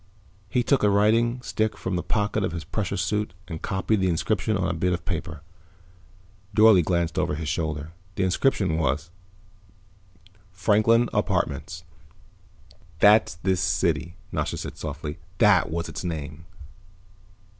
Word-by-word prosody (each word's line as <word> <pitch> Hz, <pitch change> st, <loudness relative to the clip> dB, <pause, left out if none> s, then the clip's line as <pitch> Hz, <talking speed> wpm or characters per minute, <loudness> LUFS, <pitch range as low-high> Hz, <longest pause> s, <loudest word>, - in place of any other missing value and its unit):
He 125 Hz, +2 st, +1 dB
took 140 Hz, +2 st, +2 dB
a 105 Hz, -, +4 dB
writing 115 Hz, +4 st, +2 dB
stick 110 Hz, -2 st, -1 dB
from 95 Hz, -, -3 dB
the 90 Hz, -, -1 dB
pocket 105 Hz, +2 st, -1 dB
of -, -, -2 dB
his 85 Hz, -2 st, -5 dB
pressure 105 Hz, -4 st, -3 dB
suit 100 Hz, +1 st, -1 dB
and 80 Hz, -3 st, -6 dB
copied 95 Hz, +2 st, 0 dB
the 95 Hz, -1 st, +1 dB
inscription 100 Hz, +4 st, 0 dB
on 95 Hz, -1 st, 0 dB
a 90 Hz, -, -1 dB
bit 90 Hz, +2 st, 0 dB
of 90 Hz, -, -4 dB
paper. 80 Hz, -3 st, -4 dB, 1.1 s
Dorle 110 Hz, -4 st, +7 dB
glanced 85 Hz, 0 st, 0 dB
over 85 Hz, -5 st, 0 dB
his 80 Hz, +1 st, -5 dB
shoulder. 75 Hz, 0 st, -3 dB, 0.2 s
The 95 Hz, -, 0 dB
inscription 95 Hz, -3 st, +1 dB
was: 75 Hz, +2 st, -1 dB, 1.4 s
FRANKLIN 110 Hz, +5 st, +3 dB
APARTMENTS -, -, -1 dB, 1.1 s
"That's 105 Hz, 0 st, +5 dB
this 95 Hz, +2 st, 0 dB
city," 85 Hz, 0 st, 0 dB, 0.2 s
Nasha -, -, -2 dB
said -, -, -6 dB
softly. 75 Hz, +4 st, -6 dB, 0.2 s
"That 105 Hz, -4 st, +4 dB
was 85 Hz, +1 st, -3 dB
its -, -, -6 dB
name." 80 Hz, -1 st, -5 dB
90 Hz, 140 wpm, -25 LUFS, 80-105 Hz, 1.4 s, Dorle